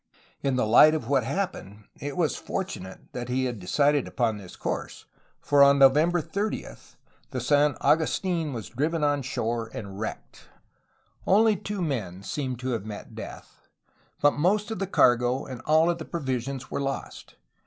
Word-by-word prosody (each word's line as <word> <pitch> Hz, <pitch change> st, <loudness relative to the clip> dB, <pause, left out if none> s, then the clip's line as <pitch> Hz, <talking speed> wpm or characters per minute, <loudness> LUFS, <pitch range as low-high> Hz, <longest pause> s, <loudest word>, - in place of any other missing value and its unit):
In 135 Hz, -2 st, 0 dB
the 125 Hz, -, +1 dB
light 150 Hz, +8 st, +7 dB
of 145 Hz, -8 st, -4 dB
what 135 Hz, -2 st, +2 dB
happened 110 Hz, -, -4 dB, 0.2 s
it 145 Hz, +4 st, -5 dB
was 165 Hz, -4 st, +1 dB
fortunate 95 Hz, -, -5 dB
that 120 Hz, 0 st, -5 dB
he 130 Hz, +1 st, 0 dB
had 120 Hz, -4 st, -3 dB
decided 140 Hz, +9 st, +2 dB
upon 115 Hz, -5 st, 0 dB
this 95 Hz, -3 st, -11 dB
course, -, -, -5 dB, 0.3 s
for 145 Hz, -1 st, +3 dB
on 140 Hz, 0 st, +7 dB
November 150 Hz, +6 st, +5 dB
30 200 Hz, +7 st, -3 dB, 0.6 s
the -, -, -3 dB
San 145 Hz, -1 st, +2 dB
Agustin 165 Hz, 0 st, +1 dB
was 115 Hz, -5 st, -6 dB
driven 150 Hz, +6 st, -1 dB
on 145 Hz, -1 st, +2 dB
shore 115 Hz, -2 st, -2 dB
and 100 Hz, -, -6 dB
v/recked. 100 Hz, +3 st, -7 dB, 0.8 s
Only 215 Hz, +2 st, +5 dB
two 200 Hz, 0 st, -4 dB
men 100 Hz, -, -3 dB
seem 135 Hz, -2 st, -3 dB
to 125 Hz, +2 st, -5 dB
have 115 Hz, -5 st, -2 dB
met 105 Hz, -1 st, -8 dB
death, -, -, -10 dB, 0.6 s
but 145 Hz, -, +7 dB
most 205 Hz, +8 st, +1 dB
of 220 Hz, -, -4 dB
the 195 Hz, -, -2 dB
cargo 125 Hz, -5 st, +3 dB
and 130 Hz, -2 st, -8 dB
all 160 Hz, +2 st, +5 dB
of 170 Hz, -1 st, 0 dB
the 160 Hz, -, -6 dB
provisions 135 Hz, -4 st, -4 dB
were -, -, -2 dB
lost. 135 Hz, 0 st, -5 dB
140 Hz, 165 wpm, -26 LUFS, 120-160 Hz, 0.8 s, light